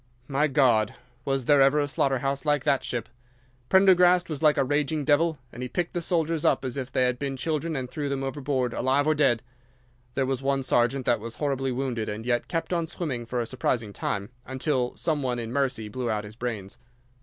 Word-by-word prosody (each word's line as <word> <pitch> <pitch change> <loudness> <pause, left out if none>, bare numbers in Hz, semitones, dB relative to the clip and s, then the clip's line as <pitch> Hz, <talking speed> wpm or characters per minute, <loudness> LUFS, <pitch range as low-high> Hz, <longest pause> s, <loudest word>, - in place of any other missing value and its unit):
My 145 +2 +2
God! 120 -6 +3 0.3
Was 135 -2 0
there 145 0 +5
ever 135 +2 +5
a 145 - +1
slaughter 135 -1 +1
house 135 +2 -2
like 145 -3 +1
that 135 - +2
ship! 120 -3 -3 0.6
Prendergast 180 -2 +5
was 150 - -4
like 150 -2 +4
a - - +4
raging 145 +2 0
devil, 155 +2 +3 0.2
and 120 - -8
he 125 - -3
picked 175 +4 -2
the 175 - -1
soldiers 165 -2 0
up - - +2
as 125 - -3
if 130 -2 -4
they 130 - +2
had 125 -1 +1
been 140 -1 -3
children 160 +3 -2
and 130 -2 -3
threw 145 +2 -4
them 135 -1 -2
overboard 135 -2 -1
alive 135 +3 +1
or 155 - +3
dead. 135 -6 +2 0.7
There 135 - +1
was 130 -1 -1
one 135 0 0
sergeant 125 +1 +1
that 120 - +2
was 115 +2 -7
horribly 135 -3 -1
wounded 125 -3 -2
and 105 +2 -5
yet 120 -1 0
kept 165 +1 -2
on 170 -2 0
swimming 140 -9 -4
for 125 0 -1
a - - -2
surprising 115 -3 -2
time, 100 +2 -3
until 130 -1 -1
some 155 -3 0
one 125 -2 -1
in 115 0 -5
mercy 130 -6 0
blew 120 +3 -3
out 105 -1 -1
his 105 +1 -10
brains. 115 -2 -5
135 Hz, 215 wpm, -26 LUFS, 120-150 Hz, 0.7 s, there